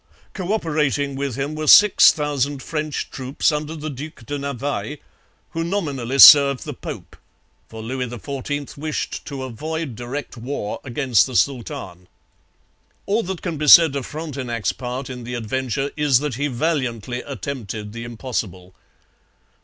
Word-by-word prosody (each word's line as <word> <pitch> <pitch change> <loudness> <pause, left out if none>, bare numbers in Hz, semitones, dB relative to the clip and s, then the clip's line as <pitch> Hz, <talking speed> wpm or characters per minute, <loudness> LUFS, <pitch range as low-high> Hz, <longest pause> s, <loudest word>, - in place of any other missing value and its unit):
Co 185 -1 -4
operating 150 -8 0
with 135 -3 -3
him 140 +3 -3
were 155 0 -4
six 210 +5 +8
thousand 145 -2 -2
French 155 -2 -3
troops 130 +4 0
under 150 +1 -3
the 155 -1 -5
Duc 140 -2 -9
de 145 +2 -4
Navailles, 140 +2 -3 0.5
who 165 - -2
nominally 145 -9 -2
served 140 -2 +9
the - - -5
Pope, - - -8 0.5
for 110 0 -8
Louis 125 +2 -3
XIV 140 +4 -5
wished 155 0 -4
to 135 -2 -6
avoid 150 +2 -5
direct 125 +4 -6
war 120 -3 -4
against 130 -3 +2
the 130 - -7
Sultan. 95 -9 -2 1.0
All 210 +3 +1
that 190 -3 -6
can 170 -3 -3
be 150 - -1
said 160 -1 +8
of 135 -3 -3
Frontenac's 130 - -3
part 125 +1 -5
in 125 -2 -7
the 125 +1 -5
adventure 130 +4 -2
is 145 -4 +3
that 145 0 -2
he 140 +5 -1
valiantly 125 -4 -2
attempted 110 -7 -6
the 115 0 -6
impossible. 110 -6 -5
140 Hz, 145 wpm, -21 LUFS, 120-150 Hz, 1.0 s, served